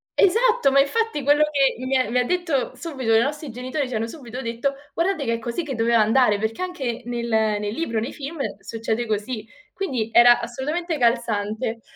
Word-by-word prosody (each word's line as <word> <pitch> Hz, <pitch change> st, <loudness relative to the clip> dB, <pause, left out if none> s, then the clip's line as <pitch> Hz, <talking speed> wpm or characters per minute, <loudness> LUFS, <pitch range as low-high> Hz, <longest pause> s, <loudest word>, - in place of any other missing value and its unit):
esatto, 450 Hz, -, +4 dB
ma 275 Hz, -, +5 dB
infatti 300 Hz, -, +1 dB
quello 290 Hz, +2 st, +4 dB
che 275 Hz, -2 st, +2 dB
mi 265 Hz, +1 st, +2 dB
ha 255 Hz, -4 st, 0 dB
mi 250 Hz, -, 0 dB
ha 250 Hz, -, +3 dB
detto 335 Hz, -5 st, -1 dB
subito 265 Hz, -9 st, -2 dB
i -, -, +6 dB
nostri 295 Hz, 0 st, -3 dB
genitori 255 Hz, +4 st, -3 dB
ci -, -, -6 dB
hanno 225 Hz, +1 st, -1 dB
subito 250 Hz, -1 st, -8 dB
detto: 235 Hz, +4 st, -2 dB, 0.2 s
"Guardate 335 Hz, -3 st, 0 dB
che 230 Hz, -, 0 dB
è -, -, -5 dB
così 235 Hz, +9 st, -3 dB
che 275 Hz, -4 st, -4 dB
doveva 230 Hz, 0 st, +3 dB
andare, 215 Hz, -1 st, +3 dB
perché 220 Hz, -, -3 dB
anche 260 Hz, -10 st, -4 dB
nel 240 Hz, -1 st, -3 dB
nel 215 Hz, -2 st, +1 dB
libro, 230 Hz, -7 st, -2 dB
nei 230 Hz, -, -4 dB
film 295 Hz, +3 st, -7 dB, 0.2 s
succede 225 Hz, +2 st, -3 dB
così". 215 Hz, +1 st, -3 dB, 0.3 s
Quindi 255 Hz, -, -2 dB
era 240 Hz, 0 st, +7 dB
assolutamente 310 Hz, +7 st, -3 dB
calzante. 230 Hz, -2 st, 0 dB
250 Hz, 190 wpm, -23 LUFS, 225-295 Hz, 0.3 s, era